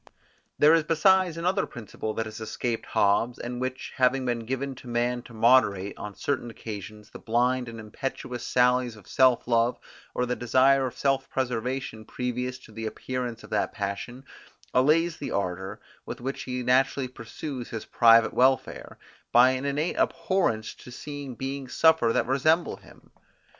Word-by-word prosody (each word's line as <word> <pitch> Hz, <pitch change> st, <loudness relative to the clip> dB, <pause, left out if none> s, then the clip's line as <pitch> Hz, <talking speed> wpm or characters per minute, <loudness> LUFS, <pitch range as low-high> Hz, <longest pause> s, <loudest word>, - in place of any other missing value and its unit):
There 150 Hz, +2 st, +6 dB
is 165 Hz, -1 st, +4 dB
besides 175 Hz, +2 st, +3 dB
another 180 Hz, +3 st, 0 dB
principle 110 Hz, -1 st, -6 dB
that 115 Hz, -, -1 dB
has 110 Hz, 0 st, -8 dB
escaped 115 Hz, +1 st, -3 dB
Hobbes, 110 Hz, +4 st, +2 dB
and 120 Hz, +1 st, -5 dB
which, 130 Hz, 0 st, -4 dB
having 130 Hz, 0 st, +2 dB
been 120 Hz, -2 st, -2 dB
given 135 Hz, +2 st, -2 dB
to 130 Hz, -, -12 dB
man 120 Hz, +1 st, 0 dB
to 120 Hz, -, -15 dB
moderate, 110 Hz, -4 st, +3 dB
on 105 Hz, -1 st, -8 dB
certain 140 Hz, -4 st, -2 dB
occasions, 105 Hz, -1 st, -8 dB
the -, -, -10 dB
blind 125 Hz, +2 st, +1 dB
and 115 Hz, -1 st, -8 dB
impetuous 120 Hz, +3 st, -5 dB
sallies 125 Hz, -1 st, +2 dB
of 105 Hz, -3 st, -16 dB
self 130 Hz, -3 st, +3 dB
love, 115 Hz, 0 st, +2 dB, 0.4 s
or 125 Hz, -, +1 dB
the 125 Hz, 0 st, -1 dB
desire 130 Hz, +3 st, +3 dB
of 125 Hz, -, -9 dB
self 135 Hz, -1 st, 0 dB
preservation 125 Hz, -2 st, -3 dB
previous 125 Hz, +2 st, -3 dB
to 130 Hz, -, -17 dB
the 110 Hz, +1 st, -5 dB
appearance 125 Hz, 0 st, -4 dB
of -, -, -13 dB
that -, -, 0 dB
passion, 100 Hz, +6 st, -5 dB, 0.5 s
allays 160 Hz, +6 st, +3 dB
the -, -, -5 dB
ardour, 95 Hz, -1 st, -3 dB, 0.2 s
with -, -, -7 dB
which 135 Hz, +3 st, -4 dB
he 125 Hz, -1 st, -3 dB
naturally 130 Hz, +2 st, +2 dB
pursues 125 Hz, +2 st, -7 dB
his 110 Hz, -, -6 dB
private 115 Hz, -1 st, +5 dB
welfare, 130 Hz, +1 st, +1 dB, 0.3 s
by 125 Hz, +2 st, +7 dB
an 130 Hz, +1 st, -3 dB
innate 145 Hz, +4 st, -1 dB
abhorrence 165 Hz, -, 0 dB
to -, -, -14 dB
see 145 Hz, +2 st, -7 dB
beings 135 Hz, +1 st, -5 dB
suffer 160 Hz, -8 st, +4 dB
that -, -, +1 dB
resemble 155 Hz, +6 st, +2 dB
him. -, -, -19 dB
125 Hz, 165 wpm, -27 LUFS, 115-135 Hz, 0.5 s, by